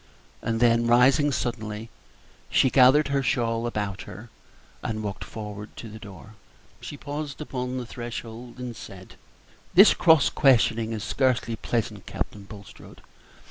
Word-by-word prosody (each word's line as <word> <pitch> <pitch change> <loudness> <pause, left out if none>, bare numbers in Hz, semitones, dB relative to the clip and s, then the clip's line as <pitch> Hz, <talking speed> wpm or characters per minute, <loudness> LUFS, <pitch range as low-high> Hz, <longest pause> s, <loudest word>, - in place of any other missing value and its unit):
Then, 115 0 +2
rising 130 +5 +4
suddenly, 115 -3 -4 0.6
she 130 - +3
gathered 135 +3 +5
her 140 0 +1
shawl 115 -3 0
about 105 -4 -3
her 105 +5 -11 0.5
and 110 -1 -4
walked 100 -2 -6
toward 105 -1 -8
the 110 -1 -9
door. 105 0 -12 0.5
She 145 - -8
paused 145 0 -6
upon 130 -4 -4
the 125 - -4
threshold 120 0 -8
and 125 -2 -6
said, 95 -3 -11 0.6
"This 195 +4 +8
cross 160 -5 +4
questioning 115 -4 +3
is 110 -2 -4
scarcely 125 -3 0
pleasant, 110 -2 -3
Captain 100 -1 -5
Bulstrode. 100 -1 -13
115 Hz, 130 wpm, -25 LUFS, 110-130 Hz, 0.6 s, This